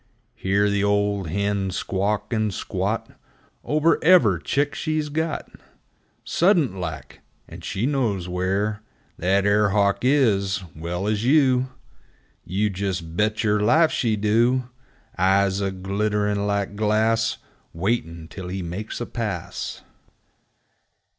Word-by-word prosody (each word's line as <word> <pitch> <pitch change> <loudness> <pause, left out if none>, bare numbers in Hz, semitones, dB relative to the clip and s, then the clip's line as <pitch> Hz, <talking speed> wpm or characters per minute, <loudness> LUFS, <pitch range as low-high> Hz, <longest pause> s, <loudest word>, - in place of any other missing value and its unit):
Hear 100 +2 +1
the 100 0 +1
old 100 -2 +1
hen 100 +2 -1
squawk, 100 +5 -2
and 110 -2 +1
squat - - -3 0.5
Over 155 +2 +2
ever' 140 - +5
chick 145 - 0
she's 155 -2 -2
got, 160 +2 -2 0.8
Suddent 170 - +3
like! 90 -4 -6 0.3
And - - -11
she 95 +6 -2
knows 115 -10 0
where 95 +4 -1 0.4
That 95 +3 +2
air 105 0 +3
hawk 100 0 +2
is, 105 -8 +2
well 85 +4 -4
as 105 0 0
you! 130 -2 +3 0.7
You 100 +3 -1
jes' 95 -1 -1
bet 105 +7 -1
yer 105 -1 +2
life 155 +10 +4
she 115 -3 +1
do! 120 +5 +1 0.5
Eyes 95 +1 +3
a 100 - 0
glittern' 100 +2 -1
like 100 0 -1
glass, 110 +2 +1 0.3
Waitin' 85 -3 -2
till 90 +2 -8
he 95 0 -4
makes 95 +8 -5
a - - -1
pass! 105 -10 -5
105 Hz, 120 wpm, -23 LUFS, 95-115 Hz, 0.8 s, ever